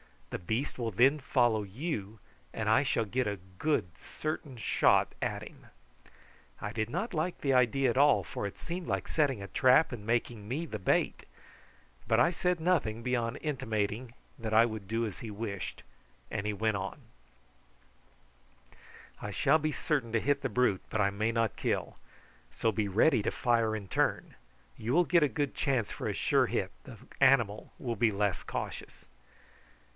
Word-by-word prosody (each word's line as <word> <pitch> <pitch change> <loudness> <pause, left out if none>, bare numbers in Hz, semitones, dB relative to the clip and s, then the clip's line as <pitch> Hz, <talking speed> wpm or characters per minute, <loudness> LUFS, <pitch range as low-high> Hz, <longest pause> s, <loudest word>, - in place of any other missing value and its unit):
The - - -3
beast 110 +10 -2
will 115 -2 -1
then 130 +9 +4
follow 120 -5 +2
you, 105 - -4 0.4
and - - -2
I - - +5
shall 115 - 0
get 125 +4 -1
a 100 -1 -2 0.2
good 150 - +1
certain 155 -4 -5
shot 110 - +3
at - - -2
him." - - -13 0.9
I 105 - -4
did 110 0 -2
not 190 - -3
like 170 +2 -2
the 135 -2 +2
idea 130 +2 +3
at 120 - -1
all, 140 -8 +5
for 100 - -4
it 100 - -9
seemed 170 +1 -5
like - - -1
setting 135 -9 +1
a - - -6
trap 130 +8 +4
and 110 -4 -7
making 115 -2 -1
me 145 +9 -2
the 110 -9 -6
bait; 95 - +1 0.8
but 110 - +3
I 125 +8 +5
said 180 0 0
nothing 145 -10 +1
beyond 125 +1 -1
intimating 115 -5 -2 0.3
that 110 -1 -3
I 115 +1 +7
would 110 -4 -5
do 115 +2 0
as 105 - -6
he 120 -3 -6
wished, 105 -2 -5 0.5
and 100 - -2
he 105 - 0
went 110 0 0
on: 95 0 -5 2.2
"I 105 - -4
shall 140 +9 +3
be 155 0 -1
certain 130 -8 -1
to 115 - +3
hit 140 0 +1
the 135 - -1
brute, 125 -7 +2
but 110 - 0
I 100 - +3
may 110 +3 0
not 115 -2 0
kill, - - -2 0.6
so 115 - +1
be 105 0 -1
ready 110 +6 +4
to - - -1
fire 115 -3 +1
in 100 -3 -6
turn; - - 0 0.4
you 115 +3 -2
will 175 +3 +5
get 170 -2 +4
a - - +5
good 145 -1 -2
chance 130 -7 0
for - - -4
a - - -1
sure - - +2
hit, - - -1
the - - -10 0.2
animal 120 -6 +3
will 120 -3 -3
be 115 +1 +3
less 100 -4 0
cautious." - - -6
115 Hz, 180 wpm, -31 LUFS, 105-140 Hz, 2.2 s, I